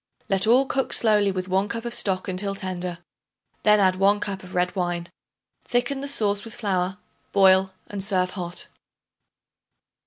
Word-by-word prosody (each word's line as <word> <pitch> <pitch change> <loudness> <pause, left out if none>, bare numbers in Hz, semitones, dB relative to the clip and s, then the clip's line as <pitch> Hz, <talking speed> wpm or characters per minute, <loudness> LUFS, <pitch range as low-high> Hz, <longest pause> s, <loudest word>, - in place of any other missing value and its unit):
Let 195 +2 +2
all 250 +4 +5
cook 270 0 -1
slowly 210 -3 +4
with 185 -1 -4
1 190 +2 +1
cup 230 +2 -4
of 235 - -2
stock 190 -4 +1
until 195 +1 -2
tender; 180 -2 -4 0.6
then 210 0 +5
add 185 -2 +3
1 200 +2 +3
cup 200 -2 -4
of 185 0 -10
red 180 +1 0
wine. 175 -2 -2 0.5
Thicken 245 +3 -1
the 280 - -4
sauce 205 -7 -1
with 225 - -8
flour, 190 -3 -1 0.3
boil 190 -1 +5
and 200 -2 -5
serve 185 -2 +1
hot. 175 -2 -4
195 Hz, 160 wpm, -24 LUFS, 185-210 Hz, 0.6 s, all